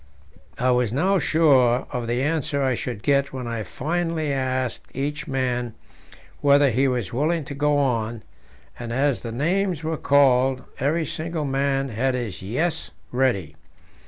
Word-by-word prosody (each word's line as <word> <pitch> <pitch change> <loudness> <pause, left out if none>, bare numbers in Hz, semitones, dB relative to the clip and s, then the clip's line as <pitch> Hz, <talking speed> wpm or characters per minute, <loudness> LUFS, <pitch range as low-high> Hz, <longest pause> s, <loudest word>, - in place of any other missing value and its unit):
I 125 +1 +2
was 125 -3 +2
now 185 +10 +2
sure 135 -7 +3
of 120 -2 -3
the 120 +2 0
answer 145 -2 0
I 130 -1 +2
should 120 -3 -4
get 140 0 +2
when 130 -2 -5
I 115 -1 -3
finally 160 +4 -2
asked 130 -2 -2
each 150 +5 -3
man 125 -4 -1 0.6
whether 140 -1 +5
he 130 +4 +2
was 120 -7 -2
willing 155 +5 0
to 140 - -6
go 145 +1 +1
on, 115 -5 0 0.6
and 120 -1 -5
as 135 +2 +1
the 115 - -5
names 170 - 0
were 160 0 -2
called, 130 -2 +3 0.2
every 155 +4 +1
single 165 -1 -3
man 135 0 0
had 125 +3 0
his 120 -7 -4
"Yes" 160 - -1 0.2
ready. 120 - 0
135 Hz, 155 wpm, -23 LUFS, 125-150 Hz, 0.6 s, whether